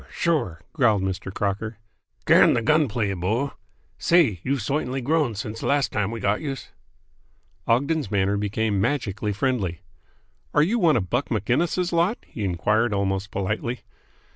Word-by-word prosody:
Sure!" 120 - -1
growled 115 -10 +3
Mr. 95 0 -3
Crocker. 105 +3 -2 0.5
"Can - - +6
the 115 - 0
gun 150 +3 +3
play, 105 -3 -1
bo! 110 +10 -1 0.5
Say, 155 - +3
you've 135 -3 -1
soitanly 135 +2 -1
grown 150 -4 +1
since 110 +1 -5
de - - -3
last 140 -1 +2
time 105 -1 0
we 115 0 -5
got 105 0 0
youse!" 135 -4 -5 1.0
Ogden's 140 +2 +1
manner 100 0 +1
became 105 0 0
magically 105 -5 -1
friendly. 100 -6 -1 0.7
"Are 150 - +6
you 220 +9 +1
one 160 - +4
of 95 -5 -3
Buck 125 +4 0
Maginnis' 155 - 0
lot?" 170 +7 +2
he 110 - -6
enquired 105 +5 +1
almost 100 0 -1
politely. 110 +6 -3
110 Hz, 150 wpm, -24 LUFS, 100-140 Hz, 1.0 s, Can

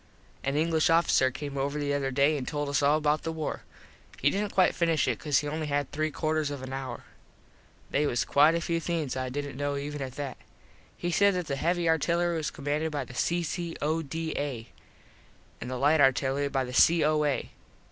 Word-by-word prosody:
An 140 +1 -1
English 160 0 +2
officer 165 -5 +4
came 140 +1 -5
over 140 +2 -1
the 145 -1 -1
other 140 -1 0
day 140 +3 +3
an 135 -3 -4
told 145 -1 -2
us 140 - +1
all 145 +2 +4
about 150 0 +1
the 165 - -3
war. 160 -2 -4 0.6
He 145 - +2
didnt 205 +1 -2
quite 185 -1 +3
finish 165 -3 +1
it - - 0
cause 145 -3 +1
he 145 - 0
only 155 +1 -3
had 145 -1 -1
three 155 +1 -1
quarters 155 0 -1
of 140 -2 -6
an 130 0 -6
hour. 135 -1 -5 0.9
They 145 +1 +2
was 120 - 0
quite 150 +3 +5
a 170 - 0
few 165 0 -1
things 165 -5 -2
I 130 -1 -2
didnt 140 0 -5
kno 145 0 -1
even 145 +1 -5
at 130 -2 -5
that. 140 -3 -5 0.6
He 175 - -2
said 200 +2 +4
that 180 -1 -2
the 140 -3 -2
heavy 170 +4 0
artillery 170 +2 +2
was 155 -2 -1
commanded 150 +3 -2
by 145 -3 -3
the 125 - -12
C.C.O.D.A. 160 -5 -2 0.9
an - - -5
the 130 0 -3
light 145 +4 +3
artillery 135 +1 +2
by 135 -1 0
the 125 0 -7
C.O.A. 150 -1 +3
150 Hz, 200 wpm, -28 LUFS, 140-160 Hz, 0.9 s, quite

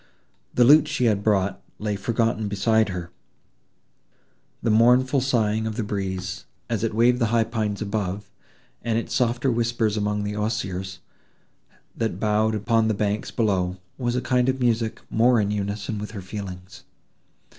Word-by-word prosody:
The 125 - +5
lute 150 +4 +7
she 145 -4 0
had 105 -3 +2
brought 100 -2 +1 0.2
lay 105 -1 -2
forgotten 115 0 0
beside 105 +2 +2
her; 90 -2 -5 1.5
the 115 - +2
mournful 125 +4 +4
sighing 110 -4 +1
of 110 - -4
the 115 - -2
breeze, 95 -2 -4 0.3
as 115 -2 -1
it 110 -2 -1
waved 120 +2 +4
the 115 - +2
high 115 +1 +3
pines 110 -3 -2
above, 100 -1 -3 0.5
and 115 -1 0
its 115 - -3
softer 125 +1 +1
whispers 115 -2 0
among 105 0 -1
the 105 0 -3
osiers, 95 -4 -3 0.9
that 115 -1 -2
bowed 110 +1 +1
upon 115 +1 +2
the 110 - +1
banks 105 +1 -1
below, 95 -5 0 0.2
was 120 -1 -1
a 125 - 0
kind 125 0 +1
of 130 0 0
music 115 -2 0
more 120 +1 +4
in 105 -1 0
unison 105 +1 -3
with 105 - -5
her - - -5
feelings. 95 -2 -8
110 Hz, 155 wpm, -24 LUFS, 100-115 Hz, 1.5 s, lute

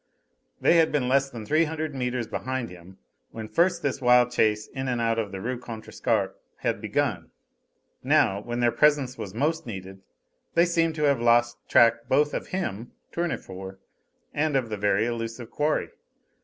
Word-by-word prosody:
They 170 - +4
had 160 -1 +4
been 140 -4 0
less 135 +1 +2
than 115 -4 -8
three 155 +7 +3
hundred 155 -1 -4
metres 125 -2 -2
behind 130 -2 -4
him 90 +1 -13 0.3
when 110 -1 -7
first 175 +5 +1
this 140 -1 -1
wild 125 0 +5
chase 105 -3 +2
in 130 0 -5
and 125 -2 -1
out 115 -1 +1
of 105 -3 -3
the 95 - -5
Rue 125 +5 -3
Contrescarpe 115 -3 -2 0.3
had - - -1
begun. - - -1 0.7
Now, 100 +1 +3
when 120 +2 -4
their 120 -1 +4
presence 140 0 +3
was 105 -4 -7
most 150 +4 -1
needed, 95 -2 -8 0.5
they 170 - +5
seemed 165 -2 +1
to 150 - -2
have 140 -4 +3
lost 120 0 +3
track 115 0 +4
both 145 +2 +3
of - - -3
him 120 - -4 0.2
Tournefort 95 - -4 0.6
and 150 0 0
of 130 -4 0
the 105 - -3
very 100 +1 +2
elusive 115 0 -4
quarry. 150 +1 0
120 Hz, 170 wpm, -26 LUFS, 110-145 Hz, 0.7 s, wild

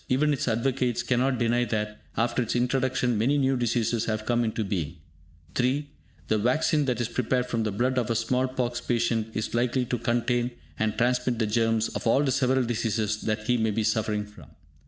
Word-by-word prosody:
Even 150 +4 +3
its 135 - -2
advocates 125 +1 0
cannot 130 +1 +1
deny 120 +1 +2
that, 105 -2 -3 0.2
after 120 +2 +1
its 115 - -2
introduction, 125 -2 +1
many 135 +6 +2
new 135 -1 +2
diseases 120 -1 0
have 110 -1 -2
come 120 0 +2
into 110 -1 -1
being. 90 -6 -3 0.6
(3) 140 +4 0 0.4
The 110 - +2
vaccine 145 +6 +2
that 125 -3 -1
is 120 - 0
prepared 125 +1 0
from 115 -2 -2
the 110 -1 -1
blood 125 +5 +1
of 120 - -2
a 115 - +1
small 125 +3 +1
pox 125 -2 -2
patient 115 -2 0
is 110 - -2
likely 125 +2 +1
to 125 0 -2
contain 120 +1 0 0.3
and 110 0 0
transmit 125 +1 +1
the 110 - +1
germs 115 0 +1
of - - -4
all 135 +5 +4
the 135 - +1
several 130 0 +2
diseases 110 -2 -1
that 110 -1 -2
he 125 +2 +2
may 110 -1 +1
be 110 +1 0
suffering 105 -1 0
from. 105 -8 -15
120 Hz, 200 wpm, -26 LUFS, 110-125 Hz, 0.6 s, all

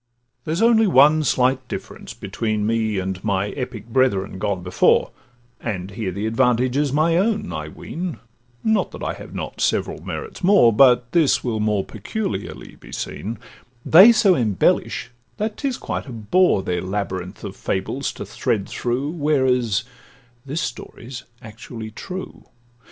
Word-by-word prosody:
There's 165 +7 0
only 225 -2 +5
one 155 -1 +5
slight 130 -2 +1
difference - - -7
between 110 -2 -2
Me 110 -2 0
and 95 0 -3
my 100 -1 0
epic 125 -4 -6
brethren 110 -7 +1
gone 100 -3 -2
before, 90 0 +3 0.5
And 95 -4 -4
here 100 -2 -3
the 100 +4 -4
advantage 125 +2 +2
is 145 -1 +1
my 160 +4 +2
own, 200 - 0
I 75 -1 -4
ween 170 - -6 0.5
(Not 220 -1 +2
that - - -8
I - - -1
have - - -11
not - - -5
several - - 0
merits 445 - -6
more, 180 - +6
But 125 0 +5
this 160 -5 +3
will 115 -3 -1
more 105 -2 0
peculiarly 220 -4 -5
be - - -15
seen); 110 +4 -5 0.5
They 190 +9 +9
so 215 -4 +4
embellish, 110 - +1 0.3
that 215 0 -2
'tis 275 -4 -2
quite - - -4
a - - -7
bore 115 - +2
Their 90 -1 -1
labyrinth 95 0 -4
of 100 -2 -6
fables 110 +8 -2
to - - -7
thread 105 -1 -1
through, 125 +4 -2
Whereas 130 - +1 0.6
this 150 +5 -2
story 120 0 -7
's 125 -1 -7 0.2
actually 110 0 -9
true. 185 - -8
120 Hz, 150 wpm, -22 LUFS, 105-155 Hz, 0.6 s, They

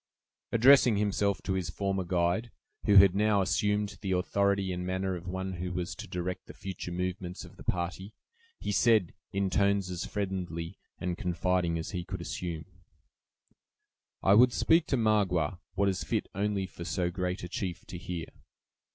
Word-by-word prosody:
Addressing 125 -1 +6
himself 100 -2 0
to 95 - -1
his 95 -3 -2
former 95 +2 -1
guide, 90 +6 0 0.4
who 105 - +4
had 95 -2 +9
now 105 0 +3
assumed 105 +2 0
the 95 -2 -1
authority 100 +1 +1
and 90 0 -3
manner 95 +1 -1
of 90 0 -8
one 95 +1 -3
who 90 +1 -3
was 90 -1 -3
to - - -8
direct 90 +1 -4
the - - -11
future 95 -2 -6
movements 90 0 -4
of - - -15
the - - -12
party, 95 +4 -3 0.4
he - - -3
said, 110 -8 +3 0.2
in 100 -1 0
tones 100 -1 +2
as 90 +3 -4
friendly 90 -3 -4 0.2
and 90 -1 -3
confiding 90 -1 0
as 80 - -4
he 90 -3 -3
could 95 +1 -6
assume: 85 -1 -4 1.6
"I 95 - +6
would 120 +3 +6
speak 165 0 +3
to 135 - +1
Magua, 95 -7 +2 0.2
what 100 +1 +2
is 95 -1 0
fit - - -1
only 100 0 0
for 85 -1 -9
so 90 0 -1
great 90 +1 -3
a - - -4
chief 90 -1 -4
to 90 - -7
hear." 85 -2 -4
95 Hz, 170 wpm, -30 LUFS, 90-100 Hz, 1.6 s, had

